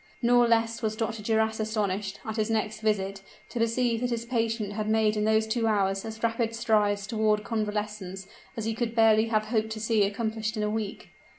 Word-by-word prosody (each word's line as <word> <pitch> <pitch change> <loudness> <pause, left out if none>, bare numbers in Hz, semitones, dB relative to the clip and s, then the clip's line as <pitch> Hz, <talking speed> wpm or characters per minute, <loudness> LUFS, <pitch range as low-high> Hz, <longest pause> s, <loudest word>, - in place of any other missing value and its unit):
Nor 240 0 +5
less 230 0 +1
was 215 -1 -1
Dr. 225 0 -3
Duras 220 +1 +1
astonished, 210 -2 -2
at 220 0 -4
his 215 0 0
next 215 -1 -1
visit, 195 -2 -1 0.3
to 240 - -4
perceive 230 0 +1
that 250 - 0
his 235 -1 -2
patient 225 -3 -1
had 215 0 -2
made 220 -1 +3
in 210 0 0
those 220 0 +3
two 225 +1 0
hours 195 -2 +1
as 220 0 -7
rapid 230 0 0
strides 210 -3 +2
toward 215 -1 +1
convalescence 210 -3 -3 0.3
as 220 - -3
he 225 - 0
could 230 0 -2
barely 220 -1 +5
have 215 -1 +1
hoped 220 -1 +1
to 220 - -6
see 220 0 +1
accomplished 220 +2 -2
in 210 - 0
a 210 - 0
week. 215 -2 -4
220 Hz, 200 wpm, -27 LUFS, 210-225 Hz, 0.3 s, Nor